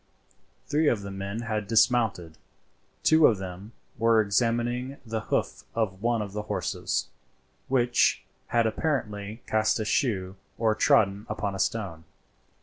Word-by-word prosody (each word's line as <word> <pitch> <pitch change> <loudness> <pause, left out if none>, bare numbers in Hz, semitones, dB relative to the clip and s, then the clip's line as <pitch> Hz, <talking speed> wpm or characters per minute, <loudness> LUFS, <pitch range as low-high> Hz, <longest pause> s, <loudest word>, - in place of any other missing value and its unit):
Three 150 +1 +1
of 110 -7 +1
the 100 - -6
men 100 +3 -4
had 110 -3 -3
dismounted; 110 -7 +2 0.6
two 160 -1 +6
of 110 - +2
them 95 +3 -8 0.3
were 115 0 +4
examining 120 +5 0
the 110 0 -2
hoof - - -2
of 100 -4 -1
one 115 -1 +1
of 100 -1 -8
the 105 - -2
horses, 105 - -2 0.6
which 120 -2 +2 0.2
had 120 -1 +2
apparently 110 -4 -2
cast 110 +1 +1
a 110 - -2
shoe 95 -5 0 0.2
or 110 -1 +2
trodden 110 -5 +3
upon 100 -2 -2
a 95 - -6
stone. 95 -6 -2
110 Hz, 140 wpm, -27 LUFS, 100-120 Hz, 0.6 s, two